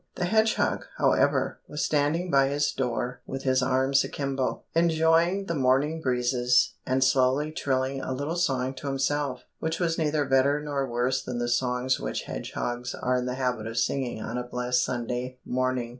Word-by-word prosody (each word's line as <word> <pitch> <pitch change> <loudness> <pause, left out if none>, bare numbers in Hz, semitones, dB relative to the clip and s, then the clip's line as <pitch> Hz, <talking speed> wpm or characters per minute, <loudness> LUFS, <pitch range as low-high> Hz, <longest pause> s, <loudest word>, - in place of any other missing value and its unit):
The 180 - -1
hedgehog, 220 +3 +1
however, - - +2
was 150 - -3
standing 155 +4 +1
by 135 -1 +5
his 145 +1 +1
door 125 -1 -2
with 135 0 -5
his 130 -1 +2
arms 130 +2 +2
akimbo, 135 -2 -2
enjoying 165 +3 +3
the 170 - -2
morning 140 +3 +2
breezes, 125 -1 +2
and 130 +1 +2
slowly 130 +3 +2
trilling 135 -2 -1
a - - -4
little 145 +5 -2
song 135 -7 0
to 140 - -6
himself, 135 0 -1 0.2
which 160 +1 -2
was 170 -2 0
neither 150 -2 +1
better 135 +2 +3
nor 140 -3 -2
worse 125 +2 0
than 125 -2 -4
the 120 0 -1
songs 125 +1 +1
which - - -3
hedgehogs 120 - -4
are 125 0 0
in 125 0 -1
the 125 - -2
habit 125 -4 -2
of 115 +1 -6
singing 120 +1 0
on 120 +2 -3
a - - -3
blessed 125 0 0
Sunday 125 +1 -3
morning. 130 -1 -1
130 Hz, 175 wpm, -27 LUFS, 125-145 Hz, 0.2 s, by